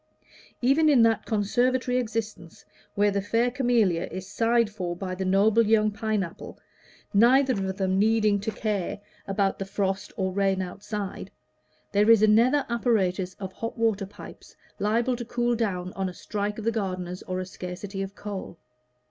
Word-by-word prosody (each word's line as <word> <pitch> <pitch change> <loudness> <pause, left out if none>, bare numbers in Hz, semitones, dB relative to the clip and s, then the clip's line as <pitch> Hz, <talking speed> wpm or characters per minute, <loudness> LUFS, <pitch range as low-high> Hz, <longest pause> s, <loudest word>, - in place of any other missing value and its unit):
Even 295 +5 +4
in 260 -6 +6
that 225 -1 +2
conservatory 250 +4 +1
existence 220 -7 -4 0.3
where 205 0 +3
the 200 0 0
fair 230 +5 +1
Camellia 235 -9 +1
is 185 0 -7
sighed 230 +3 +2
for 180 -4 -4
by 185 +1 -5
the 185 +1 -3
noble 205 +4 +4
young 215 -1 +3
Pine 215 -1 -1
apple, 170 - -9 0.6
neither 255 +6 +5
of 190 -3 -3
them 190 -1 +1
needing 215 -1 +3
to 210 - -3
care 210 -4 -2 0.3
about 195 0 0
the 195 - -3
frost, 195 0 -2
or 190 -1 -1
rain 195 -1 +1
outside, 195 +2 -5 0.6
there 210 +2 +3
is 225 -2 +7
a - - +6
nether 245 +7 +4
apparatus 195 -6 0
of 190 -1 -7
hot 230 +4 -5
water 220 -4 +1
pipes 200 - -13 0.2
liable 230 +5 +1
to 240 - -5
cool 240 0 0
down 185 -5 -2
on 190 -1 -2
a 180 - -10
strike 210 +2 -3
of 220 - -6
the 230 - +2
gardeners 185 -4 -3
or 185 0 -2
a 185 - -3
scarcity 190 +2 -6
of 195 0 -5
coal. 200 -4 -7
205 Hz, 170 wpm, -26 LUFS, 190-230 Hz, 0.6 s, is